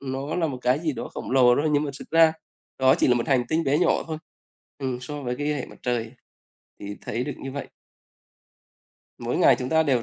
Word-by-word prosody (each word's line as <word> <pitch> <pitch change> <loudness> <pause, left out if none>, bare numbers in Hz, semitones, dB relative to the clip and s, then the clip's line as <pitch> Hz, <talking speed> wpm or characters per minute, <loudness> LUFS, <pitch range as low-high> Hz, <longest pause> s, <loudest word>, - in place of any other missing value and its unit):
nó 135 +2 -4
là 170 -2 +1
một 130 -4 -4
cái 125 +3 +3
gì 160 -2 -1
đó - - -6
khổng - - -7
lồ 125 -2 +6
đó, 145 - 0
nhưng 145 0 +3
mà 140 - -3
xực 135 - -10
ra 165 -1 +6 0.5
đó 130 0 +5
chỉ - - +2
là 125 - +5
một 120 - -1
hành 130 -3 +3
tinh 160 +1 +1
bé 140 +2 +2
nhỏ - - +2
thôi, 160 -1 -4 0.6
ừm, 130 -3 -3
so 145 +3 -6
với 125 -1 -2
cái 145 0 -2
hệ 135 - -4
mặt - - -14
trời 120 -1 -1 0.7
thì 100 0 -6
thấy 125 - -3
được 145 - -4
như 135 - -6
vậy. 140 +1 -5 1.5
Mỗi - - -2
ngày - - +6
chúng 125 - -3
ta 160 0 +4
đều 130 -6 +1
135 Hz, 235 wpm, -25 LUFS, 125-150 Hz, 1.5 s, lồ